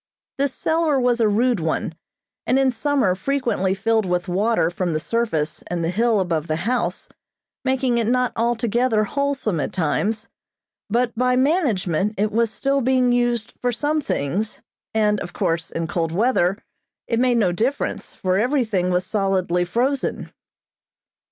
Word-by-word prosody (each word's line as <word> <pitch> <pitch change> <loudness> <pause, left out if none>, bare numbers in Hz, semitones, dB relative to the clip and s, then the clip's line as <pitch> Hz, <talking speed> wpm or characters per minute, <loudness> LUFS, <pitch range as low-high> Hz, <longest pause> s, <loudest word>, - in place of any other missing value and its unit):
This 280 -1 0
cellar 320 -3 +1
was 245 -1 +2
a 220 - +4
rude 235 +2 +2
one, 160 0 -2 0.5
and 255 - +3
in 270 -1 +3
summer 255 -5 +1
frequently 195 -3 0
filled 220 +1 +1
with 180 +1 -1
water 190 -1 +1
from 175 -1 -2
the 155 - 0
surface 165 -8 -1
and 175 -1 -2
the 165 - 0
hill 225 +2 +2
above 170 -4 -1
the 155 - 0
house, 245 +1 -1 0.6
making 260 -2 +1
it 225 - 0
not 250 +1 +1
altogether 235 0 +1
wholesome 275 - -1
at - - -2
times, 210 +6 -1 0.6
but 235 +2 0
by 250 +2 +2
management, 220 - +1
it 210 +2 +1
was 230 +1 +2
still 275 +5 0
being 255 0 +3
used 240 -2 0
for 245 - +1
some 295 +6 0
things, 200 - -2 0.3
and 210 -2 +2
of 175 -2 -7
course, 165 0 -1
in 165 - -3
cold 165 0 -2
weather, 195 -1 +2 0.5
it 230 - 0
made 250 -1 +3
no 195 -6 +3
difference, 235 +10 -2
for 185 0 0
everything 220 -7 +1
was 180 0 +1
solidly 190 -4 0
frozen. 255 +9 -1
225 Hz, 155 wpm, -22 LUFS, 185-250 Hz, 0.6 s, a